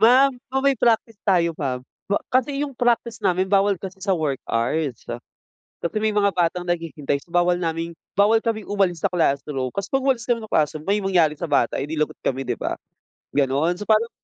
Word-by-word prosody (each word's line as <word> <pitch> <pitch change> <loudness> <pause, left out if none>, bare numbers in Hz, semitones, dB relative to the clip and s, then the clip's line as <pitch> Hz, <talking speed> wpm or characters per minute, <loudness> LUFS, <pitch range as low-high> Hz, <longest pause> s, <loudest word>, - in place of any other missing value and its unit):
Ma'am, 255 +4 +6 0.2
o 265 - +2
may 275 0 +3
practice 225 -1 +1
tayo 170 -4 +2
ma'am. 130 -4 -2 0.3
Wa 200 - +1
kasi 260 +2 +1
yung 280 -3 -5
practice 235 -2 +1
namin 185 0 +2
bawal 195 -1 +3
kasi 190 0 -7
sa 195 - +2
work 150 -6 -1
hours. 125 +3 -1 0.8
Kasi 170 - -4
may 220 - +2
mga 200 -1 +2
batang 175 0 0
naghihintay, 160 -5 -2
so 170 - -25
bawal 175 0 +3
naming 165 -1 -3 0.2
bawal 210 +2 +6
kaming 220 -3 -2
umalis 195 -4 +1
sa - - +2
classroom. 140 -6 0
Kasi 200 +5 -4
'pag 270 +5 0
umalis 255 -5 +1
kami 235 -2 +1
ng 220 - -10
classroom, 155 0 +1
may 200 +4 +1
mangyari 175 -6 +2
sa 170 - -3
bata, 140 -6 +1
edi 150 +3 -3
lagot 155 -1 -1
kami, 135 0 -1
'di 120 -2 -3
ba? - - -2 0.6
Gano'n. 145 +6 +1
So 210 - -6
parang, 220 +1 +3
180 Hz, 200 wpm, -23 LUFS, 155-220 Hz, 0.8 s, Ma'am